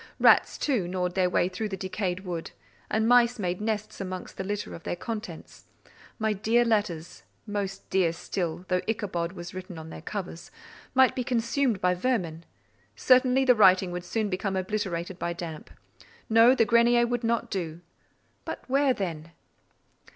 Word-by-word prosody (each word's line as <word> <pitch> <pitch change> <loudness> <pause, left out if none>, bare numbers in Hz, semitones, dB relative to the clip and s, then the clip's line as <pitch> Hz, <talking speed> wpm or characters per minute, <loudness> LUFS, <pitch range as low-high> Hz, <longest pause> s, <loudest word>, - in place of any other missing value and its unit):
Rats, - - +5
too, 245 -12 0
gnawed 180 0 -2
their 185 -1 +2
way 180 - +2
through 200 +4 -4
the 195 - -4
decayed 185 0 -3
wood; 175 -3 -5 0.4
and 220 +1 +1
mice 245 0 +5
made 180 -2 -2
nests 215 -1 -3
amongst 185 -1 -6
the - - -4
litter 205 +2 -4
of 165 - -8
their - - -3
contents: 220 +4 -7 0.5
my 220 -2 0
dear 225 +4 +2
letters 205 -8 -1 0.2
(most 200 -2 -4
dear 185 -3 +3
still, 175 0 -4
though 180 -1 +1
Ichabod 185 -6 -2
was 175 -2 -8
written 185 -2 -8
on 160 0 -9
their - - -9
covers) 180 -2 -6 0.5
might 260 -1 +5
be 255 - -1
consumed 235 -1 0
by 180 0 +3
vermin; 180 -6 -2 0.5
certainly 255 +1 +4
the 250 - +7
writing 190 -4 +5
would 175 0 -4
soon 220 +3 -1
become 190 0 -2
obliterated 185 -2 -3
by 170 - -2
damp. 165 -3 -7 0.6
No; 230 +3 +6
the 225 - +3
grenier 235 +2 +4
would 245 0 -2
not 230 0 0
do—but 170 -3 -8
where 270 0 +3
then? 165 -4 -5
195 Hz, 160 wpm, -27 LUFS, 180-230 Hz, 0.6 s, the